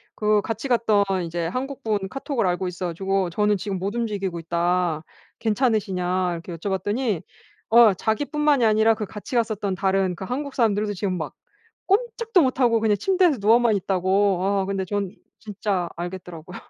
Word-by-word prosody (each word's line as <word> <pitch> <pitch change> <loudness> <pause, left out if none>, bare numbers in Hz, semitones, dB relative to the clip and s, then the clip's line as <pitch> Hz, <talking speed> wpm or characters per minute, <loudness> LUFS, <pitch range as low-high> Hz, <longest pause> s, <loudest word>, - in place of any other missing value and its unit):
그 210 -1 +2
같이 225 +5 -4
갔던 220 -4 +3 0.2
이제 165 0 -3
한국분 225 -4 -3
카톡을 270 -5 -2
알고 180 +1 0
있어 180 0 -4
가지고 190 +2 -1
"저는 210 +4 +2
지금 195 -1 -4
못 200 +4 -3
움직이고 200 -7 -2
있다. 170 -1 0 0.4
괜찮으시냐." 195 -6 0
이렇게 170 +1 -7
여쭤봤더니 205 +3 -1 0.5
어 230 -3 +7
자기 220 +9 -1
뿐만이 295 -4 +2
아니라 220 +1 +4
그 215 -1 -4
같이 215 +4 -8
갔었던 210 -4 -1
다른 190 -1 +1
그 190 - -7
한국 275 +4 -4
사람들도 210 -3 +1
지금 185 -1 -2
막 160 - -5 0.5
꼼짝도 455 -1 +2
못 260 -2 +1
하고 230 -2 +4
그냥 215 -2 +2
침대에서 360 - +2
누워만 225 +1 +4
있다고. 190 +1 +1
아 195 0 +1
근데 190 -1 -2
전 200 -2 -2 0.3
진짜 200 -4 -2
알겠더라고요. 175 -1 -7
205 Hz, 365 characters per minute, -23 LUFS, 185-230 Hz, 0.5 s, 어